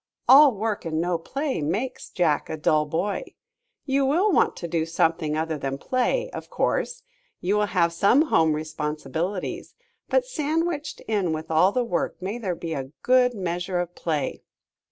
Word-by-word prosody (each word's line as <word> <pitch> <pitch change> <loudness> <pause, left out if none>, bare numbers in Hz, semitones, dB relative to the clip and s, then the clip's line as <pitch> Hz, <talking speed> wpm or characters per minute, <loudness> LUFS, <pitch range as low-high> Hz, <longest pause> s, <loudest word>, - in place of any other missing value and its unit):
All 280 +1 +9
work 215 0 -2
and 160 -2 -2
no 175 0 0
play 275 - -3
makes 205 - -3
Jack 160 -5 0
a 160 - -3
dull 150 0 +2
boy. 190 +7 -3 0.5
You 275 0 +1
will 340 +10 +3
want - - +3
to 170 - -5
do 165 -1 0
something 160 -1 0
other 160 -1 -2
than 135 0 -3
play, 375 - 0
of - - -8
course. - - -1 0.4
You 190 +4 0
will 210 0 +2
have 170 -3 +1
some 200 - +4
home 160 - +3
responsibilities, 155 +4 -4 0.3
but - - +2
sandwiched 320 - -2
in 200 -7 0
with 155 0 -5
the 190 +10 +3
work 175 - -2
may 200 +6 -4
there 190 -6 -2
be 165 -1 -5
a 135 -2 -4
good 250 -1 +4
measure 180 -1 -2
of 175 0 -3
play. 155 -6 -2
180 Hz, 165 wpm, -25 LUFS, 160-255 Hz, 0.5 s, All